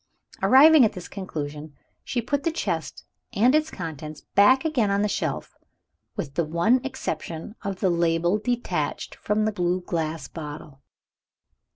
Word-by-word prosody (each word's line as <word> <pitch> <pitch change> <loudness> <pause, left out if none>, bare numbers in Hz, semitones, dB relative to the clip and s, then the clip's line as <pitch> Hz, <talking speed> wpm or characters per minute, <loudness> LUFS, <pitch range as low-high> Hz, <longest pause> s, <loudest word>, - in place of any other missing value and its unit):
Arriving 295 +2 +7
at 220 - +3
this 180 -1 -8
conclusion, 150 -5 -6 0.3
she 240 -2 -2
put 285 +4 -1
the 330 - 0
chest 325 - -3 0.3
and 240 +6 +4
its 310 +1 +2
contents 155 - -7
back 260 +9 +5
again 255 -10 +1
on 200 +1 +1
the - - +2
shelf 160 -8 -3 0.6
with 140 -3 -5
the 170 - +1
one 170 +11 +2
exception 170 - -5
of 195 -2 -4
the 190 - +3
label 170 +3 +1
detached 245 +2 -2
from 210 +1 -1
the 215 - +1
blue 180 -2 0
glass 165 -2 -3
bottle. 150 -3 -9
185 Hz, 150 wpm, -25 LUFS, 160-245 Hz, 0.6 s, Arriving